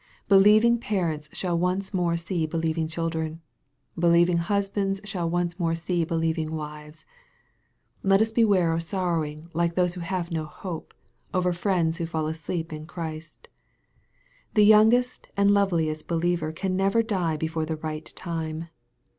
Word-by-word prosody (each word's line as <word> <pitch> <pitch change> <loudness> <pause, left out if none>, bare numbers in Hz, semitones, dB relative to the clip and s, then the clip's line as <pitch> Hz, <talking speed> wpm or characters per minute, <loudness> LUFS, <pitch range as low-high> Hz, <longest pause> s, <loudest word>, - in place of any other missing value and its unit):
Believing 215 +4 +6
parents 165 -9 -2
shall 180 -2 -2
once 185 +3 -1
more 175 -2 +1
see 170 -1 -2
believing 160 0 -1
children. 160 -1 -3 0.6
Believing 170 +1 +4
husbands 195 +2 0
shall 185 -5 -3
once 175 +1 -1
more 165 -2 +1
see 170 +1 -1
be 165 +1 -2
lieving 160 -1 -1
wives. 150 0 -8 1.0
Let 195 0 +4
us 220 +1 +2
beware 200 -7 +3
of 165 - 0
sorrowing 165 -3 -2
like 170 +1 0
those 180 -1 +2
who 180 - -7
have 175 0 -3
no 160 -2 -2
hope, 165 +2 -8 0.4
over 180 -1 +2
friends 170 -3 0
who 165 - -3
fall 160 -2 -2
asleep 160 +1 -4
in 155 0 -7
Christ. 160 -2 -7 1.1
The 210 -1 +6
youngest 220 +4 +4
and 200 0 +4
loveliest 170 -6 +1
believer 170 -1 0
can 185 +3 -2
never 195 +4 +2
die 180 -8 -1
before 160 0 -2
the 160 - -2
right 155 0 -5
time. 165 -1 -4
170 Hz, 145 wpm, -26 LUFS, 160-190 Hz, 1.1 s, Believing